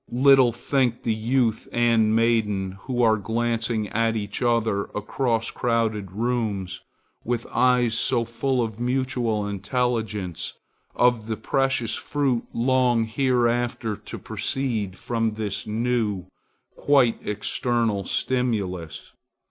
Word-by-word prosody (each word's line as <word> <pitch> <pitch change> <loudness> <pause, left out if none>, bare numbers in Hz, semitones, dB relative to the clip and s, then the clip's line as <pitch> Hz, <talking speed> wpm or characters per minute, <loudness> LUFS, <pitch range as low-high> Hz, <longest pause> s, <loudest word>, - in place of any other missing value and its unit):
Little 130 0 +5
think 125 0 0
the 115 - +1
youth 115 0 0
and 115 -2 +3
maiden 110 -5 +1
who 125 +2 -1
are 110 -1 +4
glancing 115 0 -1
at 115 0 +1
each 100 -2 -3
other 115 -4 +1
across 115 +2 -1
crowded 110 -5 -1
rooms 105 -4 -2 0.4
with 120 0 -2
eyes 125 -3 +3
so 120 -3 +2
full 125 +2 0
of 110 -1 -5
mutual 125 -4 0
intelligence, 105 -4 -2 0.4
of 120 -3 +2
the 110 -1 -2
precious 130 -1 0
fruit 135 -5 -1
long 125 -1 +2
hereafter 120 -2 0
to 105 - -9
proceed 110 -3 -2
from 115 -2 -1
this 105 -2 -3
new, 110 -4 -1 0.5
quite 135 -5 +3
external 105 0 -1
stimulus. 100 -9 -2
115 Hz, 110 wpm, -24 LUFS, 105-125 Hz, 0.5 s, Little